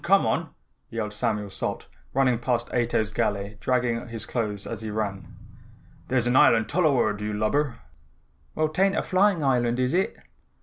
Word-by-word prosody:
Come - - +4
on!" - - 0 0.4
yelled 110 -2 -4
Samuel 105 -3 -1
Salt - - -3 0.2
running 130 -3 +2
past 120 -1 -1
Ato's 115 -3 0
galley 105 -2 -1
dragging 125 -1 +1
on - - -10
his 115 -1 -4
clothes 105 -4 -3
as 115 -2 -5
he 110 - -5
ran. 100 -4 -3 0.8
"There's 125 -2 +1
an 120 +1 +1
island 115 -3 +5
tuluward, 130 - +2
you 105 0 -2
lubber." 115 +5 0 0.8
"Well, 155 0 +1
'tain't 195 +5 +2
a - - +1
flying 190 -3 +2
island 125 -2 +2
is 130 +3 +1
it?" 185 +2 0
120 Hz, 165 wpm, -25 LUFS, 105-130 Hz, 0.8 s, island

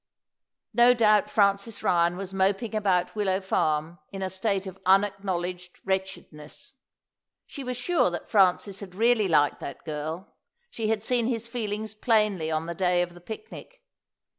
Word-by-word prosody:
No 240 +2 +6
doubt 210 -3 +4
Francis 200 +1 +1
Ryan 175 -3 +2
was 195 0 -6
moping 195 +4 0
about 190 -4 +1
Willow 195 -3 0
Farm 160 -3 -1
in 195 -1 -5
a 185 - -3
state 195 0 -1
of 190 0 -9
unacknowledged 185 -2 0
wretchedness. 190 - -5 0.7
She 280 - -8
was 250 -1 -4
sure 320 - +2
that 175 - -6
Francis 195 0 +2
had 185 -3 -10
really 225 -1 +3
liked 150 -4 +2
that - - -8
girl; 155 +5 -5 0.4
she 225 -2 -3
had 220 -1 0
seen 240 0 +1
his 235 -2 -2
feelings 215 -2 -4
plainly 210 -7 +1
on 155 0 -1
the 170 - -4
day 180 0 +2
of 175 0 -7
the 175 - -14
picnic. 445 - -10
195 Hz, 155 wpm, -26 LUFS, 180-220 Hz, 0.7 s, No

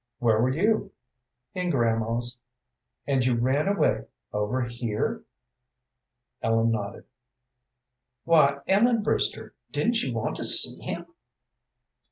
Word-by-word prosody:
"Where 115 -2 +1
were 125 - +2
you?" 200 +7 0 0.6
"In 180 -1 -3
grandma's." 120 -2 -1 0.7
"And 135 -2 0
you 125 -1 +1
ran 130 +7 0
away, 200 0 0 0.3
over 105 +5 -1
here?" 120 -2 -4 1.2
Ellen 115 0 +1
nodded. 100 -2 -5 1.2
"Why, 140 -4 +3
Ellen 225 +3 +2
Brewster, - - -1 0.2
didn't 225 0 0
you 130 - -3
want 115 - -3
to - - -4
see - - +7
him?" - - -6
125 Hz, 110 wpm, -25 LUFS, 115-175 Hz, 1.2 s, see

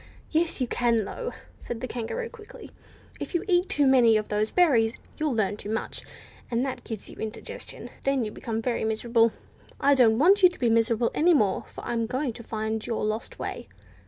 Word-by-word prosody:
"Yes 325 0 +1
you 255 - +1
can, 235 -3 +1
though," 485 - -5 0.3
said 235 - -6
the 255 - -4
Kangaroo, 250 - -4
quickly. 460 -3 -12 0.5
"If - - -5
you 345 - +1
eat 360 -1 +2
too 290 - +3
many 245 -4 +6
of 215 - -3
those 210 +1 0
berries, 240 -11 +3 0.2
you'll 305 -5 0
learn 205 -2 0
too 210 - -8
much, 220 +1 -3 0.5
and 240 +2 0
that 265 - -4
gives 220 -3 -7
you - - -12
indigestion, 220 -1 -6
and - - -8
then 270 -3 +1
you 210 - -5
become 225 0 -4
miserable. 230 -1 +2 0.5
I 285 +1 +5
don't 235 -5 +5
want 380 - +5
you 365 - +8
to 360 - -13
be 240 -3 +2
miserable 230 +1 +2
any 340 +2 +4
more, 205 -8 +1
for - - -9
I'm 230 -1 -1
going 255 +1 -2
to 235 - -10
find 220 -1 -3
your 230 -2 -2
lost 215 +1 -3
way." - - -5
235 Hz, 200 wpm, -26 LUFS, 220-290 Hz, 0.5 s, you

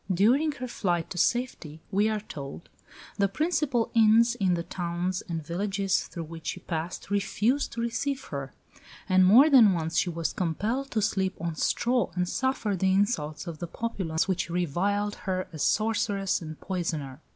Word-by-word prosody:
During 250 - +3
her 255 -3 -6
flight 175 -8 -1
to 180 - -4
safety, 235 -12 -1
we 205 +2 +2
are 215 -1 -1
told, 140 -5 -8 0.5
"the 200 - +4
principal 285 - 0
inns 230 +1 +5
in 190 -6 +1
the 170 - -3
towns 175 +1 -3
and 165 -3 -3
villages 195 +3 -1
through 170 - -6
which 165 0 -9
she 185 - -3
passed 170 +4 -5
refused 215 +7 +1
to 230 - -3
receive 265 +4 -2
her"; 140 -2 -4 0.6
and 185 0 +5
more 230 +11 +8
than 240 -9 +7
once 165 -1 0
she 180 - 0
was 165 -1 -2
compelled 215 - -1
to 215 -5 0
sleep 190 -2 0
on 170 0 -2
straw 240 +10 +1
and 180 0 0
suffer 260 -3 -1
the 190 +1 +1
insults 190 -7 0
of 165 -3 -7
the 175 - -4
populace, 180 -6 -2
which 185 -2 -1
reviled 185 +5 0 0.2
her 185 0 -1
as 155 - -6
sorceress 205 -3 +1
and 155 -1 -8
poisoner. 160 -7 -4
190 Hz, 170 wpm, -27 LUFS, 170-225 Hz, 0.6 s, more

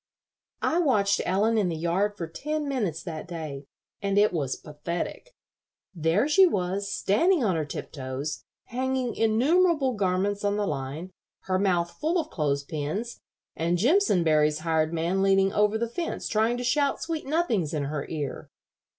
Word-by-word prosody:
I 335 - +2
watched 205 - +2
Ellen 215 +4 +2
in 190 -4 +1
the 165 - -2
yard 190 +6 0
for 170 - -3
ten 300 - -3
minutes 205 - -2
that 160 -1 -6
day, 155 -5 -6 0.4
and 200 0 0
it 205 -1 +4
was 140 -6 -1
pathetic. 170 - -6 0.6
There 170 - +1
she 375 +5 +6
was, 200 - -1
standing 300 - +2
on 190 -6 +2
her 155 -2 -1
tiptoes, 140 0 -5 0.3
hanging 255 -1 -1
innumerable 275 +6 +3
garments 200 0 0
on 205 0 +1
the 210 - 0
line, 150 +3 -4 0.3
her 185 -1 -1
mouth 175 -3 +1
full 325 +4 +1
of 315 -1 -4
clothes 145 -3 0
pins, 160 +10 -4 0.4
and 170 +2 0
Jimpsonberry's 170 - +3
hired 160 -1 +1
man 170 +3 0
leaning 195 0 +3
over 210 +1 +3
the 235 +1 -1
fence 330 +9 -4
trying 225 +2 +1
to 245 - -4
shout 280 +3 +1
sweet 320 -4 -4
nothings 245 - +1
in 150 -3 -1
her 145 0 -3
ear. 150 -4 -5
195 Hz, 160 wpm, -27 LUFS, 160-245 Hz, 0.6 s, she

